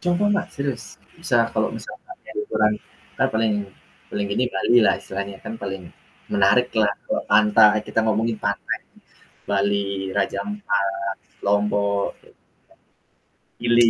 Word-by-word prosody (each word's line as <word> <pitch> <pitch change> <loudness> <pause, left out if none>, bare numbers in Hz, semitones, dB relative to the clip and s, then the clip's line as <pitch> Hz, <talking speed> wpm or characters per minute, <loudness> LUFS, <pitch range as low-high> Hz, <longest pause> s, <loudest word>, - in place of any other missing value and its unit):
Contoh 185 +4 +2
Mbak 205 - +1
serius, 140 -1 -4 0.2
bisa - - +2
kalau - - +1
misalkannya 370 -7 -10
liburan 105 - +2 0.5
kan - - +4
paling 110 -1 +2 0.5
paling 100 -1 -2
gede 125 +4 +2
Bali 120 +2 +3
lah, 110 - +4
istilahnya 100 0 -5
kan - - -5
paling 95 -3 -6 0.4
menariklah 105 +1 +3
kalau - - -1
pantai 105 0 +5
kita 115 - -1
ngomongin 110 0 +1
pantai 100 - -1 0.7
Bali, 100 -1 0
Raja 100 - 0
Ampat, 100 - -1 0.5
Lombok, 100 0 +2
gitu. - - -22 1.2
Gili 120 -1 +5
105 Hz, 120 wpm, -23 LUFS, 100-120 Hz, 1.2 s, pantai